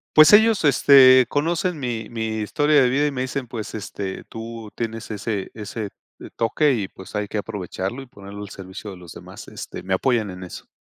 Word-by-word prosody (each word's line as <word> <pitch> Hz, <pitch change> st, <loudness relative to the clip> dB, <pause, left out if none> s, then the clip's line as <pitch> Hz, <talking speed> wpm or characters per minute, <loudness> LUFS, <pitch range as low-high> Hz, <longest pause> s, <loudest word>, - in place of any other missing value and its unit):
Pues 155 Hz, 0 st, +9 dB
ellos, 220 Hz, -1 st, +6 dB
este, 130 Hz, -2 st, +7 dB
conocen 170 Hz, +4 st, -1 dB
mi 120 Hz, -5 st, -4 dB
mi 110 Hz, -1 st, -3 dB
historia 145 Hz, +7 st, +3 dB
de 130 Hz, -, +4 dB
vida 140 Hz, +4 st, +2 dB
y 150 Hz, -, 0 dB
me 130 Hz, -2 st, -2 dB
dicen, 130 Hz, 0 st, -4 dB
pues, 115 Hz, -3 st, -6 dB
este: 100 Hz, -2 st, -5 dB
"Tú 115 Hz, -1 st, -8 dB
tienes 115 Hz, -1 st, -5 dB
ese 105 Hz, -1 st, -3 dB
ese, 105 Hz, 0 st, -6 dB, 0.3 s
eh, -, -, -9 dB
toque 140 Hz, +6 st, +2 dB
y 110 Hz, -7 st, -1 dB
pues 95 Hz, +2 st, -12 dB
hay 105 Hz, 0 st, -1 dB
que 105 Hz, -, -4 dB
aprovecharlo 100 Hz, +2 st, -4 dB
y -, -, -10 dB
ponerlo 100 Hz, -4 st, -11 dB
al -, -, -8 dB
servicio 95 Hz, +2 st, -9 dB
de -, -, -9 dB
los 90 Hz, -2 st, -12 dB
demás," -, -, -11 dB
este, -, -, -8 dB
me 95 Hz, +1 st, -2 dB
apoyan 110 Hz, +1 st, +1 dB
en 90 Hz, 0 st, -8 dB
eso. 90 Hz, -, -10 dB
115 Hz, 205 wpm, -22 LUFS, 100-135 Hz, 0.3 s, Pues